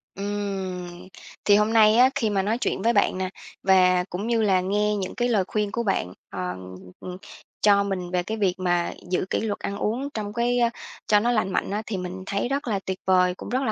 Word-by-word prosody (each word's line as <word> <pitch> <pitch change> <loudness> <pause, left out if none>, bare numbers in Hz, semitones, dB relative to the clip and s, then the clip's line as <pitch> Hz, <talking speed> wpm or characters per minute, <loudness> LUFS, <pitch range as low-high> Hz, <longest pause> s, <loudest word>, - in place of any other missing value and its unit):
Ừm. 190 -3 -4 0.4
Thì 205 - +6
hôm 210 +2 +2
nay 215 -1 +6
á, 255 +1 +7
khi 220 - +1
mà 195 -2 +1
nói 215 +4 0
chuyện - - -1
với 235 +1 +3
bạn 200 -2 +2
nè, 185 -1 -2 0.3
và 185 -1 +5
cũng 195 +5 -4
như 235 -1 +2
là 190 -4 +3
nghe 210 +2 +1
những 190 -2 -4
cái 245 - +1
lời 205 -5 +3
khuyên 210 -1 -1
của 235 +1 -2
bạn, 90 - -1 0.2
ờm, 90 0 -5 0.2
ừm, 180 0 -7 0.4
cho 200 -1 +5
mình 185 -3 -3
về 180 -1 0
cái 220 +4 -4
việc 195 -4 +2
mà 175 -1 0 0.2
giữ 185 - 0
kỷ - - 0
luật 215 -2 -2
ăn 200 - -4
uống 245 +7 -2
trong 210 -1 -4
cái 245 +1 +1 0.5
cho 210 -1 +5
nó 240 +3 +1
lành 215 -5 +1
mạnh - - -1
á, 210 +1 -1
thì 205 -4 -3
mình 180 +1 -6
thấy 200 +4 -1
rất 275 -2 -2
là 200 -3 0
tuyệt 190 -1 -3
vời, 180 -1 +4
cũng - - -9
rất 255 +3 0
là 220 - 0
200 Hz, 230 wpm, -25 LUFS, 185-215 Hz, 0.5 s, á